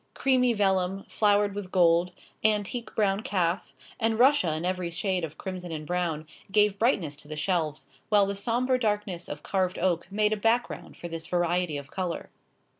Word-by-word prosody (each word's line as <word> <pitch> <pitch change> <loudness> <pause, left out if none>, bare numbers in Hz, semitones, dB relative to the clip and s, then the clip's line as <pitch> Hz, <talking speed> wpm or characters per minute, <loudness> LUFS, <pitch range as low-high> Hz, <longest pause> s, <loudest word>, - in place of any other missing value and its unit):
Creamy 255 -2 +3
vellum, 195 -2 +1
flowered 205 -1 +2
with 200 -2 -6
gold, 175 -1 +4 0.3
antique 215 +2 0
brown 200 -2 +2
calf, 180 -3 -1 0.3
and 225 -1 +1
russia 250 - +4
in 160 +2 -3
every 180 -1 -1
shade 185 +1 -1
of 160 -2 -5
crimson 185 -2 -6
and 155 -1 -5
brown, 170 -2 -1 0.3
gave 205 -1 +3
brightness 185 - +1
to 145 - -14
the 155 - -6
shelves, 155 -4 -1 0.2
while 205 -2 +5
the 200 +1 -3
sombre 245 +5 +1
darkness 205 -6 -1
of 145 0 -6
carved 185 -2 0
oak 175 -2 0
made 210 +1 +2
a - - -1
background 225 +3 -1
for 175 - -6
this 165 -1 -6
variety 175 -2 0
of 140 -1 -9
colour. 180 -3 -4
190 Hz, 175 wpm, -27 LUFS, 170-210 Hz, 0.3 s, while